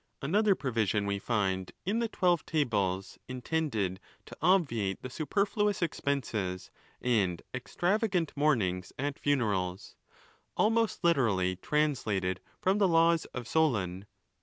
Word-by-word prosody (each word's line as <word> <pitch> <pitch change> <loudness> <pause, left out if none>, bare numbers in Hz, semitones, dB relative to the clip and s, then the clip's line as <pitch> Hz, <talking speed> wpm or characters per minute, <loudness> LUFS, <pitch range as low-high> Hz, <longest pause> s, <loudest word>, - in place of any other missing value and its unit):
Another 200 +7 +3
provision 110 - 0
we 100 0 -1
find 95 -4 -1
in 210 +5 0
the 235 - +1
Twelve 175 -6 +1
Tables 100 - -1
intended 125 - -2 0.3
to - - -11
obviate 120 - +2
the 130 - -6
superfluous 200 - 0
expenses 115 - -2 0.3
and 100 -8 +1
extravagant 180 - 0
mournings 110 -12 +1
at 140 +1 -3
funerals, 100 -10 -1 0.6
almost 225 -1 +2
literally 110 - +2
translated 105 -7 0 0.2
from 190 +2 +2
the 200 - +5
laws 165 -1 +4
of 125 -2 -7
Solon. 105 - 0
130 Hz, 110 wpm, -30 LUFS, -, 0.6 s, the